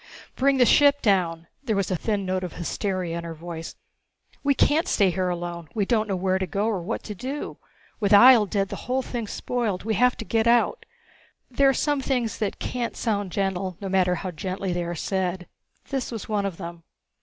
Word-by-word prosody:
"Bring 275 +1 +3
the 250 - +6
ship 285 +2 +5
down!" 175 -5 +1 0.2
There 225 -6 0
was 195 -1 -1
a - - +2
thin 200 +2 -1
note 185 0 -1
of 180 - -5
hysteria 180 -1 -2
in - - -7
her 165 -1 -6
voice. 165 0 -7 0.7
"We 280 -1 +3
can't 320 +7 +3
stay 195 - +3
here 185 +1 -1
alone. 170 -2 -5
We 205 -3 +1
don't 220 0 +1
know 195 - -1
where 185 +1 0
to 190 - -2
go 200 +2 -1
or 215 -5 0
what 170 - -4
to 210 - -6
do. 260 +8 -5 0.4
With 205 -2 0
Ihjel 220 0 +8
dead, 195 0 0
the 200 - -4
whole 260 +1 +1
thing's 235 -5 -4
spoiled. 230 -7 -2
We 220 +1 -1
have 250 +4 +3
to 225 - -6
get 225 +1 +1
out...." 240 - +2 0.6
There 275 +2 +4
are - - +3
some 290 -2 +1
things 250 -5 -1
that 210 -2 -2
can't 245 -2 -3
sound 205 -5 -1
gentle, 190 -2 -2
no 195 - -5
matter 185 -1 +2
how 185 +1 -4
gently 185 +3 -3
they 175 0 -2
are 175 0 -4
said. 185 0 -2 0.4
This 270 -3 -2
was 225 -3 -6
one 205 -2 0
of 180 -4 -6
them. 170 -2 -8
200 Hz, 210 wpm, -25 LUFS, 180-235 Hz, 0.7 s, Ihjel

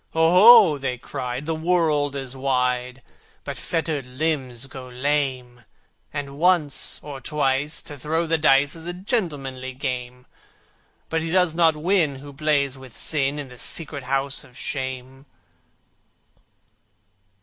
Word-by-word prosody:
"Oho!" 180 +1 +7
they 130 -2 -2
cried, 125 +2 -5
"the 165 - -1
world 160 -4 +1
is 135 -1 -5
wide, 125 -1 -1 0.4
But - - -5
fettered 160 -4 -2
limbs 130 -2 -2
go 130 -1 -10
lame! 130 -2 -2 0.5
And 140 -1 -6
once, 165 -6 +1
or 140 -2 -8
twice, 145 +1 -1
to 145 -2 -7
throw 160 +5 -1
the 165 0 +1
dice 145 -1 +4
Is 165 0 -8
a 175 - -3
gentlemanly 145 - -3
game, 125 -1 -5 0.8
But 165 0 0
he 165 - -3
does 180 -1 +2
not 165 -2 +4
win 160 -2 +1
who 140 +1 -11
plays 140 -2 0
with 130 -3 -12
Sin 145 -2 0
In 145 -3 -6
the 125 -1 -12
secret 145 -1 0
House 135 +1 0
of 130 -3 -17
Shame." 130 0 -5
140 Hz, 135 wpm, -23 LUFS, 130-160 Hz, 0.8 s, Oho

